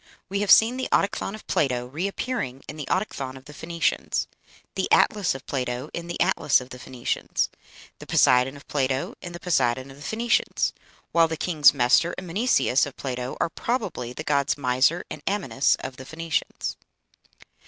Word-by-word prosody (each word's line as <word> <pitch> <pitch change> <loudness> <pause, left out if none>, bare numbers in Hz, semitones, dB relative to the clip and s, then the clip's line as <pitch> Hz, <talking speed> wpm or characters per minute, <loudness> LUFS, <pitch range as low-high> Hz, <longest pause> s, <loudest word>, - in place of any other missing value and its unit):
We 200 +1 -1
have 205 -1 -1
seen 230 +3 +7
the 260 - -3
Autochthon 200 +1 +1
of 215 - -12
Plato 125 -4 0
reappearing 160 - -3
in - - -7
the 150 -3 -6
Autochthon 135 -9 -2
of 130 - -15
the 150 - -11
Phoenicians; 170 +3 -1 0.5
the - - -2
Atlas 200 -8 +3
of 135 - -9
Plato 125 +1 -3
in 170 0 -5
the 175 - -5
Atlas 175 -5 +3
of 125 0 -10
the 125 - -8
Phoenicians; 125 -1 -2 0.5
the - - -11
Poseidon 125 +2 +4
of 140 - -16
Plato 135 -2 -1
in 175 - -7
the 175 - -7
Poseidon 130 -6 +1
of 135 - -13
the - - -15
Phoenicians; 225 +10 0 0.4
while 165 -1 +5
the 160 0 -4
kings 155 -4 +5
Mestor 140 +6 +3
and - - -6
Mneseus 175 - +2
of 140 - -11
Plato 125 -1 -4
are - - +1
probably 190 - -3
the 155 - -6
gods 140 -2 +1
Misor 135 +5 +2
and - - -6
Amynus 195 -9 +2
of 130 0 -6
the 130 - -9
Phoenicians. 165 +2 -3
145 Hz, 175 wpm, -25 LUFS, 130-180 Hz, 0.5 s, seen